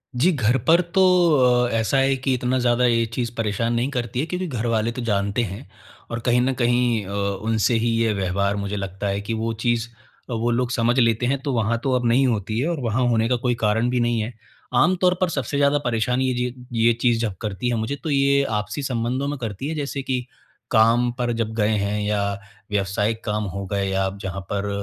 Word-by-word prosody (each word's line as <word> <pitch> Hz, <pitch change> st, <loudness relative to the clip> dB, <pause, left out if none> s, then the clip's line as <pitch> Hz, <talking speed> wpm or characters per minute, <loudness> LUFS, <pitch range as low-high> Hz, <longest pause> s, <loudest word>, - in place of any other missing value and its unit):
जी, 150 Hz, +10 st, +3 dB
घर 130 Hz, -5 st, +2 dB
पर 170 Hz, +2 st, +6 dB
तो 190 Hz, -, +4 dB, 0.6 s
अ, -, -, -1 dB
ऐसा 115 Hz, +5 st, +1 dB
है 135 Hz, 0 st, +3 dB
कि 130 Hz, 0 st, 0 dB
इतना 125 Hz, 0 st, 0 dB
ज़्यादा 120 Hz, 0 st, +2 dB
ये 115 Hz, -1 st, +3 dB
चीज़ 115 Hz, +1 st, -3 dB
परेशान 115 Hz, +1 st, 0 dB
नहीं 120 Hz, +3 st, 0 dB
करती 125 Hz, -2 st, -3 dB
है 145 Hz, -, 0 dB
क्योंकि 180 Hz, +2 st, -3 dB
घरवाले 115 Hz, -4 st, -1 dB
तो 125 Hz, -, -6 dB
जानते 100 Hz, +1 st, 0 dB
हैं। 105 Hz, +5 st, -7 dB, 0.4 s
और 115 Hz, -, -2 dB
कहीं 120 Hz, 0 st, +3 dB
न 130 Hz, +2 st, +1 dB
कहीं 120 Hz, -3 st, +2 dB
अ, -, -, -9 dB
उनसे 100 Hz, +3 st, 0 dB
ही 120 Hz, -, +2 dB
ये 115 Hz, -1 st, +2 dB
व्यवहार 100 Hz, +1 st, 0 dB
मुझे 100 Hz, 0 st, -3 dB
लगता 100 Hz, +1 st, -4 dB
है 100 Hz, 0 st, -1 dB
कि 105 Hz, +3 st, -4 dB
वो 115 Hz, +1 st, -1 dB
चीज़, 120 Hz, -1 st, +1 dB, 0.4 s
वो 120 Hz, 0 st, 0 dB
लोग 120 Hz, +1 st, 0 dB
समझ 120 Hz, 0 st, +1 dB
लेते 115 Hz, 0 st, +2 dB
हैं 135 Hz, +2 st, 0 dB
तो 140 Hz, -1 st, -2 dB
वहाँ 115 Hz, 0 st, +1 dB
तो 135 Hz, -, 0 dB
अब 125 Hz, -1 st, 0 dB
नहीं 125 Hz, +4 st, +4 dB
होती 110 Hz, -1 st, -1 dB
है 135 Hz, -, 0 dB
और 170 Hz, -3 st, -2 dB
वहाँ 120 Hz, +2 st, 0 dB
होने 115 Hz, -1 st, +2 dB
का 125 Hz, -, +3 dB
कोई 125 Hz, -1 st, +2 dB
कारण 110 Hz, +3 st, +2 dB
भी 125 Hz, 0 st, 0 dB
नहीं 120 Hz, -1 st, +1 dB
है। 110 Hz, +3 st, -4 dB, 0.4 s
आम 175 Hz, +9 st, +4 dB
तौर 180 Hz, -1 st, +4 dB
पर 185 Hz, -, +2 dB
सबसे 140 Hz, -2 st, -2 dB
ज़्यादा 140 Hz, 0 st, +3 dB
परेशानी 125 Hz, +2 st, +1 dB
ये 125 Hz, 0 st, -2 dB, 0.3 s
ये 120 Hz, -, +5 dB
चीज़ 120 Hz, -2 st, +3 dB
जब 110 Hz, -5 st, -2 dB
करती 110 Hz, +3 st, -2 dB
है 120 Hz, -, 0 dB
मुझे, 115 Hz, +5 st, -2 dB
तो 155 Hz, +3 st, -6 dB
ये 140 Hz, 0 st, +3 dB
आपसी 105 Hz, +5 st, -3 dB
संबंधों 130 Hz, +1 st, -1 dB
में 145 Hz, 0 st, -3 dB
करती 115 Hz, +2 st, -4 dB
है 160 Hz, -, -3 dB
जैसे 140 Hz, -2 st, -3 dB
कि 130 Hz, -2 st, -2 dB, 0.5 s
काम 120 Hz, +1 st, +4 dB
पर 120 Hz, -1 st, 0 dB
जब 115 Hz, -1 st, -2 dB
गए 105 Hz, -1 st, +2 dB
हैं 100 Hz, +1 st, -1 dB
या 105 Hz, 0 st, 0 dB, 0.5 s
व्यवसायिक 105 Hz, +3 st, -1 dB
काम 105 Hz, 0 st, -1 dB
हो 100 Hz, 0 st, -4 dB
गए 100 Hz, -1 st, 0 dB, 0.2 s
आप 95 Hz, +1 st, -6 dB
जहाँ 95 Hz, -1 st, -4 dB
पर 100 Hz, 0 st, -1 dB
120 Hz, 220 wpm, -22 LUFS, 105-125 Hz, 0.6 s, पर